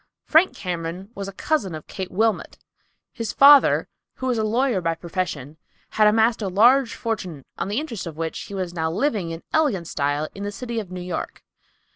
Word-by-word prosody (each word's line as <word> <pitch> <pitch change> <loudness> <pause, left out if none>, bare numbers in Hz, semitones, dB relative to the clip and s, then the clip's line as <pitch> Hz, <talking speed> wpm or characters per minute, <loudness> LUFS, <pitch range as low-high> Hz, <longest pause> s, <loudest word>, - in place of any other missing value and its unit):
Frank 325 +4 +4
Cameron 180 +2 -5
was 200 -2 -5
a - - -5
cousin 195 - -1
of 155 - -9
Kate 190 -1 -6
Wilmot. 220 +3 0 0.6
His 230 -4 -3
father, 280 0 +7 0.3
who 260 - -6
was 250 -3 +1
a - - +1
lawyer 230 -1 +1
by 165 -1 0
profession, 160 -5 -4 0.3
had 215 -1 +4
amassed 225 +2 +3
a 200 - -1
large 235 +6 +4
fortune, 180 - -4
on - - -1
the 210 +5 -1
interest 235 - -5
of 160 -2 -8
which 165 0 -3
he 200 - -8
was 185 -2 -3
now 160 -2 -1
living 200 - -1
in 165 0 -7
elegant 245 - +1
style 145 +1 -1
in 200 - -9
the 205 0 -3
city 235 +2 -4
of 205 -5 -7
New 180 -1 -6
York. 180 -1 -5
195 Hz, 195 wpm, -23 LUFS, 170-230 Hz, 0.6 s, father